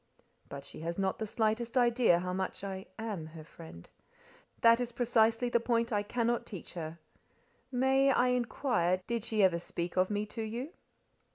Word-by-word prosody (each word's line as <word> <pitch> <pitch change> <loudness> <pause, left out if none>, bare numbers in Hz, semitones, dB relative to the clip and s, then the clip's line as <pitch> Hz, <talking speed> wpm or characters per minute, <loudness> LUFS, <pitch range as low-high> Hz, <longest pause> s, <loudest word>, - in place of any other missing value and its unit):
"But 140 0 -8
she - - -11
has 170 +2 -4
not 195 -1 -1
the 220 - -3
slightest 225 +3 0
idea 240 -6 +4
how 180 +1 -3
much 190 +1 -3
I 190 -1 -5
am 210 -8 -4
her 155 - -8
friend. 155 - -12 0.7
That 230 0 +6
is 245 -1 -3
precisely 230 0 +2
the 240 -1 +2
point 235 0 0
I 205 - +2
cannot 235 +3 0
teach 190 -6 -9
her. 160 -1 -6 0.7
May 265 +2 +3
I 250 -1 +3
inquire 240 -7 +1
did 235 -2 -2
she 220 -3 +1
ever 175 -3 +4
speak 170 +1 -5
of 185 0 +3
me 210 0 -1
to 225 +2 -6
you?" 235 +7 -4
220 Hz, 175 wpm, -31 LUFS, 185-240 Hz, 0.7 s, That